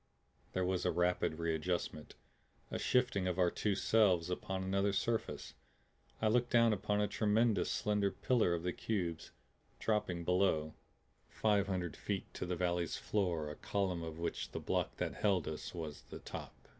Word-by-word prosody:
There 95 0 +1
was 90 0 0
a - - +2
rapid 90 -2 +1
readjustment, 85 -1 -2 0.6
a - - -2
shifting 120 -7 +2
of 90 -1 -1
our 90 -2 +3
two 105 -2 0
selves 95 -5 +3
upon 95 +1 -2
another 100 +1 +1
surface. 115 +3 -1 0.7
I 110 - +2
looked 120 +2 +3
down 115 -2 +5
upon 105 +1 0
a 105 - +2
tremendous, 110 +1 +2
slender 105 -1 +1
pillar 110 -4 +2
of 85 - -4
the 90 0 -1
cubes, 90 -7 -2 0.5
dropping 95 -6 0
below, 90 -4 +2 0.6
five 105 -3 +2
hundred 90 -4 -2
feet - - -4
to - - -4
the 90 - -1
valley's 85 -2 0
floor 85 -7 -1
a - - -7
column 95 -2 -1
of 80 -1 -6
which 85 - -3
the - - -2
block - - -1
that - - -2
held 95 -5 +1
us 80 - -4
was 80 -3 -5
the - - -7
top. - - -9
95 Hz, 165 wpm, -35 LUFS, 85-105 Hz, 0.7 s, down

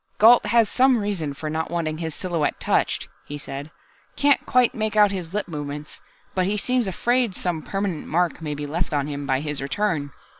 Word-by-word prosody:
"Gault 225 0 +7
has 230 0 +4
some 255 +3 +4
reason 190 -9 -2
for 155 - -5
not 160 +1 -2
wanting 160 -2 -2
his 160 -2 -4
silhouette 170 -5 -1
touched," - - 0 0.2
he 145 - -5
said. 140 0 -7 0.5
"Can't 285 -1 +3
quite 250 -1 +4
make 215 0 -2
out 210 -1 +6
his 180 -4 -4
lip 205 0 -2
movements, 150 -2 -6 0.3
but 185 -1 +1
he 210 +1 0
seems 250 +1 +1
afraid 240 +2 +1
some 175 -3 -2
permanent 195 -3 -3
mark 175 +1 0
may 150 -2 -3
be 145 0 -4
left 160 +2 -2
on 140 -1 +1
him 145 -1 -5
by 135 -1 +1
his 150 -2 -3
return. 155 -1 -1
175 Hz, 195 wpm, -24 LUFS, 150-210 Hz, 0.5 s, Gault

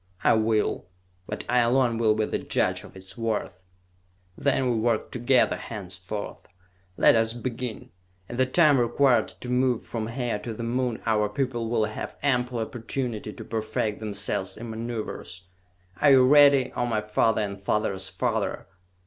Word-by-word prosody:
"I - - +5
will, 110 -3 0 0.4
but - - -5
I 125 +1 +3
alone 120 -1 +2
will 110 -2 +3
be 110 0 +1
the - - -2
judge 90 +1 0
of 105 - -14
its 95 0 -12
worth!" 110 -4 -2 0.7
"Then 135 -2 +1
we 115 - 0
work 110 0 0
together 125 +1 +2
henceforth. 95 -1 -6 0.5
Let - - +6
us 115 0 +2
begin! 120 -1 -5 0.4
In 120 - -7
the 130 0 +3
time 150 -1 +4
required 120 +2 +3
to - - -6
move 125 -1 +1
from 110 -2 -4
here 120 -2 -2
to 110 +1 -6
the 115 - -5
Moon, 120 0 -2
our 105 -2 +2
people 120 0 -2
will 115 -2 +2
have 110 - -6
ample 125 -3 +1
opportunity 115 -1 -4
to - - -10
perfect 110 -1 -2
themselves 100 -3 -3
in 115 +1 -7
maneuvers! 110 -5 -5 0.6
Are 145 - +6
you 130 -2 +7
ready, 140 -1 +6
O 120 - 0
my 110 -3 0
father, 105 +1 +1
and 100 -1 -5
father's 100 -2 -1
father?" - - -2
115 Hz, 160 wpm, -26 LUFS, 105-125 Hz, 0.7 s, you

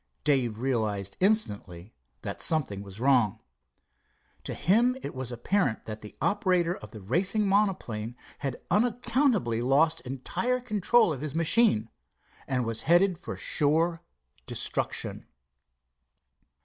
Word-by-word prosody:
Dave 125 -7 +1
realized 110 -6 -2
instantly 105 - 0 0.3
that - - -5
something 135 -11 0
was 100 0 -10
wrong. 120 -5 +2 1.1
To - - -4
him 235 - +2
it - - -5
was 130 -1 -5
apparent 120 - -1
that 110 0 -7
the 105 - -11
operator 180 -4 +1
of 205 - -11
the 110 - -11
racing 185 - +1
monoplane 180 - 0 0.2
had 135 -4 -4
unaccountably 230 - +1
lost 140 +4 +2
entire 135 - -2
control 225 -4 +2
of 135 - -7
his 155 -1 -4
machine, 165 - +3 0.6
and 125 -2 -1
was 115 -1 0
headed 175 0 +4
for - - -6
sure 165 +3 +1 0.5
destruction. - - -1
145 Hz, 120 wpm, -28 LUFS, -, 1.1 s, headed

